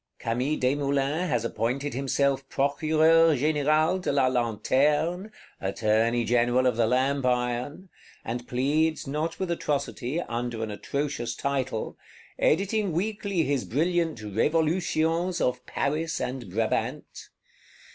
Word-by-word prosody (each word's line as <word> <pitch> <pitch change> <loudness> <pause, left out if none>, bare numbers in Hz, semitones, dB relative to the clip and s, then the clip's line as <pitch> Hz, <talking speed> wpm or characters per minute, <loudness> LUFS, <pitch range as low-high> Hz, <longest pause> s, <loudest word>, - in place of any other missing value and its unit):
Camille 125 +6 -1
Desmoulins 140 +5 0
has 120 -4 0
appointed 120 +5 -2
himself 135 +1 0
Procureur 155 +3 +3
Général 155 +5 +2
de - - -1
la 140 -2 +3
Lanterne, 140 - +1 0.3
Attorney 110 +4 +1
General 120 +2 +2
of 125 -3 +2
the 115 -1 +2
Lamp 135 +3 +1
iron; 125 +7 -1 0.4
and 120 +2 -4
pleads, 150 +5 0
not 150 +4 -3
with 185 -2 -2
atrocity, 145 -2 -2
under 120 -4 -3
an 110 - -4
atrocious 140 +3 -3
title; 130 -5 -3 0.4
editing 195 +2 +1
weekly 200 -1 -1
his 140 -3 0
brilliant 165 -2 0
Revolutions 165 - 0
of 125 - 0
Paris 160 +3 -1
and 125 -5 -4
Brabant. 110 +4 -2
140 Hz, 115 wpm, -26 LUFS, 120-160 Hz, 0.4 s, Procureur